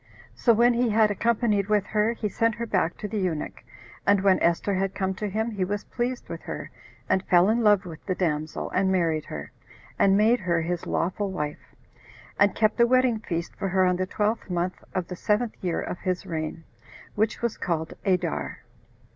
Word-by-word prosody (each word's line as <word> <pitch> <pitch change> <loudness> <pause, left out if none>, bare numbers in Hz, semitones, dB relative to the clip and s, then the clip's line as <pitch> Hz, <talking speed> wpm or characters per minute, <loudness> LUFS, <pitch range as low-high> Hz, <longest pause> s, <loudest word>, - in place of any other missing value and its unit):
So 240 - +3
when 235 +2 +5
he 240 0 +1
had 215 0 +4
accompanied 210 -2 +1
with 210 -2 +2
her, 215 +2 +1
he 225 -2 -3
sent 230 +2 +1
her 235 0 -3
back 180 -6 0
to 210 - -4
the 210 +1 -3
eunuch; 170 -5 -3 0.4
and 200 0 +4
when 195 -1 +4
Esther 170 +4 +1
had 195 0 -1
come 190 -1 -1
to 210 +2 -4
him, 220 +4 -1
he 200 -3 -1
was 205 +2 -2
pleased 245 +1 -3
with - - -6
her, - - -6 0.4
and 190 - +2
fell 180 +2 +5
in 230 +2 +2
love 205 -3 +4
with 165 -3 -9
the 185 - 0
damsel, 155 -4 -2
and 190 0 +2
married 165 -4 +1
her, 75 -1 -7 0.5
and 195 0 +5
made 225 +4 +4
her 170 -3 +1
his 175 +1 -3
lawful 195 +3 -1
wife, 150 -5 -5 0.6
and 205 0 +4
kept 215 +2 +2
a 235 - +6
wedding 255 -2 +3
feast 170 -5 -4
for 195 - -3
her 185 0 +3
on 180 -1 +2
the 185 0 -1
twelfth 210 +2 -1
month 180 +1 -2
of 185 -2 -1
the 180 - -6
seventh 215 +5 0
year 175 -2 0
of 180 - -4
his 185 +1 -2
reign, 165 -2 -4 0.5
which 215 +2 -1
was 235 -2 0
called 160 -2 -2
Adar. 180 -4 -1
195 Hz, 200 wpm, -26 LUFS, 180-215 Hz, 0.6 s, a